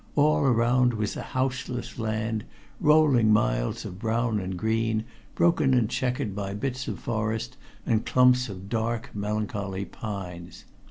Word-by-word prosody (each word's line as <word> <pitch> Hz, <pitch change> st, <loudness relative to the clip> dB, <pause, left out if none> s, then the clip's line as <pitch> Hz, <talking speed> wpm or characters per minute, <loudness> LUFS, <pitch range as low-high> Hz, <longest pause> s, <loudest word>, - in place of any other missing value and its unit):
All 150 Hz, +1 st, +4 dB
around 125 Hz, -1 st, +3 dB
was 105 Hz, -1 st, -2 dB
a -, -, -4 dB
houseless 130 Hz, -2 st, -3 dB
land, 110 Hz, -1 st, -1 dB, 0.4 s
rolling 145 Hz, -8 st, +5 dB
miles -, -, +1 dB
of 90 Hz, -, -7 dB
brown 115 Hz, 0 st, 0 dB
and 95 Hz, -1 st, -4 dB
green, 110 Hz, +1 st, 0 dB, 0.3 s
broken 165 Hz, -6 st, +3 dB
and 120 Hz, -4 st, +3 dB
checkered 125 Hz, -5 st, -1 dB
by 100 Hz, -1 st, -3 dB
bits 130 Hz, +3 st, -3 dB
of -, -, -3 dB
forest 110 Hz, -1 st, -2 dB, 0.3 s
and 110 Hz, -1 st, +1 dB
clumps 125 Hz, -1 st, +4 dB
of 95 Hz, -1 st, -8 dB
dark 115 Hz, +2 st, -2 dB
melancholy 100 Hz, -2 st, -3 dB
pines. 90 Hz, -6 st, -7 dB
110 Hz, 140 wpm, -26 LUFS, 105-125 Hz, 0.4 s, rolling